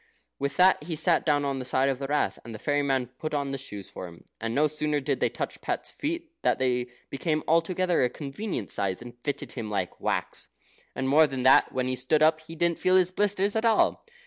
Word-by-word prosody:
With 140 0 -2
that 185 -4 +5
he 165 -1 -3
sat 165 +2 +2
down 145 -1 +3
on 135 -1 -1
the - - -4
side 130 +1 +2
of 135 -1 0
the 135 - -3
Rath, 145 +1 0
and 115 -1 -8
the - - -5
fairy 145 +5 0
man 135 -3 +1
put 130 +5 -5
on 140 -1 -1
the 135 - -3
shoes 105 -7 -8
for 90 - -7
him, 85 -1 -14
and 115 +1 -3
no 150 - +4
sooner 150 0 0
did 135 - -1
they - - +2
touch - - -5
Pat's - - -3
feet, 335 +2 -4
than - - +2
they 125 -1 0 0.2
became 155 +2 -1
altogether 175 +2 +2
a 125 - +3
convenient 145 - -5
size, 100 +2 -1
and 120 0 -10
fitted 145 - -3
him 115 -4 -5
like 100 -4 -3
wax. - - -2 0.5
And, 130 - -1
more 155 +3 +6
than 135 -3 -4
that, 130 - +6
when 130 -1 -1
he 130 0 -1
stood 130 +5 +2
up, 155 0 +4
he 160 +1 -11
didn't 170 0 +1
feel 185 0 +3
his 185 -1 +4
blisters 205 +1 0
at 220 - +1
all. 225 -2 +3
145 Hz, 235 wpm, -27 LUFS, 130-165 Hz, 0.5 s, more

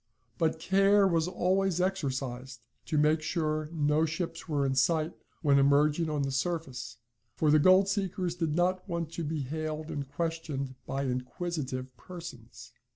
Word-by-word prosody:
But 160 -1 +1
care 195 +3 +4
was 165 -2 +1
always 185 0 +1
exercised 130 -9 -2 0.2
to 155 - 0
make 155 +1 +3
sure 155 -2 -1
no 150 -1 +2
ships 165 +1 -3
were 145 -2 +1
in 135 - +1
sight 155 +5 +2 0.3
when 140 -2 +5
emerging 150 +3 +3
on 150 -2 0
the 135 - -1
surface, 135 -6 -3 0.4
for 155 +3 +2
the 155 - +6
gold 185 +5 +6
seekers 190 -3 -1
did 165 -4 -1
not 185 +2 0
want 170 -2 -2
to 170 - -4
be 155 0 -2
hailed 155 +3 -4
and 140 -2 -4
questioned 150 -3 -3
by 135 +1 -2
inquisitive 130 0 -3
persons. 170 -11 -10
155 Hz, 155 wpm, -30 LUFS, 140-175 Hz, 0.4 s, the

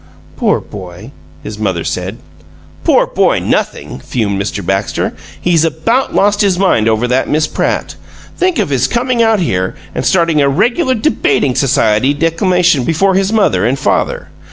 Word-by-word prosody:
"Poor - - +1
boy!" 95 +4 -10 0.3
his 105 0 -7
mother 95 -6 -1
said. 95 +4 -4 0.7
"Poor - - +3
boy - - +1
nothing!" - - -2
fumed 100 - -2
Mr. 100 -1 -4
Baxter. 95 +3 -1 0.3
"He's 170 -3 +2
about 165 - 0
lost 205 +1 +2
his 195 -3 +2
mind 145 - +2
over 110 +2 +1
that 125 +2 0
Miss 155 +1 +1
Pratt. - - -2 0.4
Think 365 -3 0
of - - 0
his 135 -2 +1
coming 245 0 0
out 225 -2 +3
here 95 - -1 0.2
and - - -3
starting 165 -4 +2
a 140 - +3
regular 240 - +1
debating 145 - +1
society 135 -1 +2
declamation 165 -1 +1
before 180 +7 +1
his 195 +1 +1
mother 200 - +2
and 125 +5 +1
father! 135 - -1
145 Hz, 155 wpm, -14 LUFS, -, 0.7 s, Poor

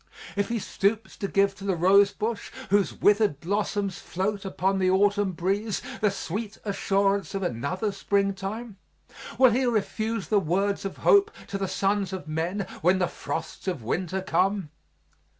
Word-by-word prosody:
If 200 0 0
he 235 - 0
stoops 215 +1 -1
to 200 - -2
give 195 0 +2
to - - -10
the 195 -2 0
rose 195 +4 +5
bush, 220 +1 -3 0.2
whose 200 -1 +3
withered 205 -8 +3
blossoms 200 +1 -1
float 195 +2 -3
upon 190 0 0
the 185 -1 +3
autumn 200 0 +3
breeze, 195 +5 -1 0.2
the 215 - +3
sweet 205 +3 -4
assurance 195 -2 +1
of 195 - -2
another 185 - -2
springtime, 200 +2 -2 0.6
will 260 -2 +7
He 255 +4 +2
refuse 220 -1 -1
the 210 - +4
words 195 +4 0
of 195 - -4
hope 405 +1 +6 0.2
to 200 - -3
the 195 - -1
sons 195 0 0
of 180 -5 -6
men 170 +6 -2 0.2
when 180 +3 +4
the 180 -1 +1
frosts 165 +3 -6
of 170 -11 -2
winter 185 - -2
come? 190 -3 +1
195 Hz, 160 wpm, -26 LUFS, 185-205 Hz, 0.6 s, will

